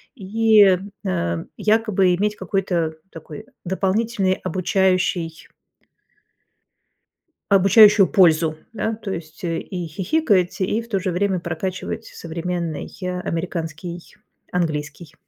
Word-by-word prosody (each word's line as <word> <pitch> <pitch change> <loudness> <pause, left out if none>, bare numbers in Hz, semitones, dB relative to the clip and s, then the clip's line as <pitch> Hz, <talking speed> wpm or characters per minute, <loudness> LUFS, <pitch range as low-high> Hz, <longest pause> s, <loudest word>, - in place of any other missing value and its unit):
и, 210 -2 +4 0.3
э, 85 -2 -1
якобы 210 -4 +2
иметь 210 +3 -1
какой-то 180 -4 -1 0.2
такой 165 +5 -10 0.2
дополнительный 195 +1 0
обучающий 185 -2 0 2.0
Обучающую 200 +1 +7
пользу. 165 -5 +4 0.2
Да, 225 0 -2
то 210 -3 -6
есть 155 -2 -7
и 175 +1 -3
хихикать, 190 - 0
и 210 +5 0
в 230 - -12
то 195 -5 -1
же 185 -1 -1
время 185 0 0
прокачивать 180 +3 -4
современный, 170 -1 -5
э, 180 0 -3
американский 170 0 -4 0.5
английский. 155 -2 -3
185 Hz, 100 wpm, -21 LUFS, 165-200 Hz, 2.0 s, Обучающую